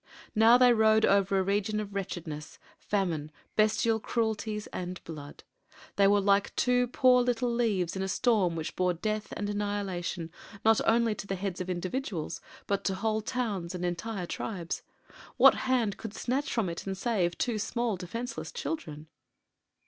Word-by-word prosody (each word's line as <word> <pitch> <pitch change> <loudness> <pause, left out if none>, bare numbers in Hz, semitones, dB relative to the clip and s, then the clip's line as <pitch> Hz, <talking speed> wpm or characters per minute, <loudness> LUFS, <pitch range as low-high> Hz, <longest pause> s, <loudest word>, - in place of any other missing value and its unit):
Now 225 +3 +7
they 250 -1 +6
rode 220 -1 +4
over 195 0 +3
a 190 - +3
region 205 +2 0
of 205 -1 -5
wretchedness, 170 -6 -5 0.2
famine, 170 -7 -1 0.2
bestial 220 +1 +3
cruelties, 220 -2 -2
and 180 0 -4
blood. 150 -3 -9 0.5
They 200 -1 +5
were 205 +1 +5
like 200 0 +2
two 250 0 +2
poor 250 0 +4
little 245 0 0
leaves 205 -8 0
in 190 - -2
a 190 - -1
storm 190 -4 +2
which 160 -1 -4
bore 180 -1 +1
death 215 +4 -3
and 205 - -2
annihilation 200 -5 -3 0.3
not 225 -1 +5
only 230 -1 +3
to 205 - -8
the 195 - -1
heads 190 -1 -3
of 185 - -5
individuals, 185 - -3 0.2
but 200 0 -1
to 190 - +1
whole 220 +2 0
towns 205 -7 -3
and 180 0 -3
entire 180 +2 -3
tribes. 175 -2 -4 0.6
What - - +8 0.2
hand 235 -6 +2
could 220 -2 -7
snatch 265 +4 -1
from 225 -5 0
it 170 +3 -5
and 190 -1 -3
save 190 -5 0
two 235 -4 -1
small, 235 +1 -1
defenseless 230 +8 -5
children? 235 - -5
205 Hz, 165 wpm, -29 LUFS, 180-225 Hz, 0.6 s, What